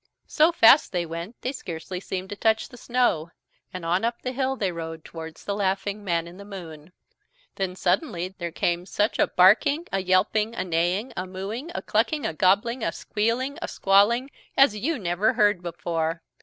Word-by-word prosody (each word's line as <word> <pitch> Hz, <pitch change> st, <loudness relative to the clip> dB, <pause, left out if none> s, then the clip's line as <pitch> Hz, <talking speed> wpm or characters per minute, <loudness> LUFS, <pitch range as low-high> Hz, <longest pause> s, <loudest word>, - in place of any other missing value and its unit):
So 315 Hz, +3 st, +3 dB
fast 280 Hz, -3 st, +6 dB
they 175 Hz, -2 st, -1 dB
went 170 Hz, +7 st, -7 dB
they 255 Hz, -, -1 dB
scarcely 180 Hz, -, -6 dB
seemed 185 Hz, 0 st, -5 dB
to -, -, -3 dB
touch 220 Hz, +1 st, +1 dB
the -, -, -13 dB
snow, 240 Hz, -10 st, 0 dB, 0.4 s
and 180 Hz, -2 st, -6 dB
on 175 Hz, +4 st, +1 dB
up 235 Hz, +1 st, -2 dB
the 255 Hz, -, -2 dB
hill 265 Hz, +1 st, -1 dB
they 195 Hz, -7 st, -1 dB
rode 165 Hz, -1 st, -7 dB
towards 160 Hz, -1 st, -9 dB
the 200 Hz, -, -1 dB
laughing 200 Hz, +1 st, -1 dB
Man 170 Hz, -3 st, -1 dB
in 175 Hz, +2 st, -12 dB
the 200 Hz, -, -10 dB
Moon. 170 Hz, -5 st, -10 dB, 0.7 s
Then 190 Hz, -2 st, -2 dB
suddenly 185 Hz, -, 0 dB
there 170 Hz, -1 st, -3 dB
came 175 Hz, +2 st, -1 dB
such 210 Hz, +2 st, 0 dB
a -, -, +4 dB
barking, 225 Hz, -, +4 dB
a 195 Hz, -, 0 dB
yelping, 210 Hz, +4 st, +1 dB
a -, -, -1 dB
neighing, 180 Hz, +7 st, 0 dB
a 185 Hz, +1 st, -4 dB
mooing, 200 Hz, -, -5 dB
a -, -, -3 dB
clucking, 255 Hz, +8 st, 0 dB
a -, -, -1 dB
gobbling, 205 Hz, +8 st, +2 dB
a -, -, 0 dB
squealing, 235 Hz, +6 st, -2 dB
a -, -, -3 dB
squawling, 220 Hz, +7 st, +3 dB, 0.3 s
as 270 Hz, -6 st, +6 dB
you 290 Hz, +10 st, -1 dB
never 190 Hz, +1 st, +1 dB
heard 205 Hz, -3 st, +3 dB
before. 165 Hz, -1 st, -3 dB
195 Hz, 185 wpm, -25 LUFS, 175-230 Hz, 0.7 s, fast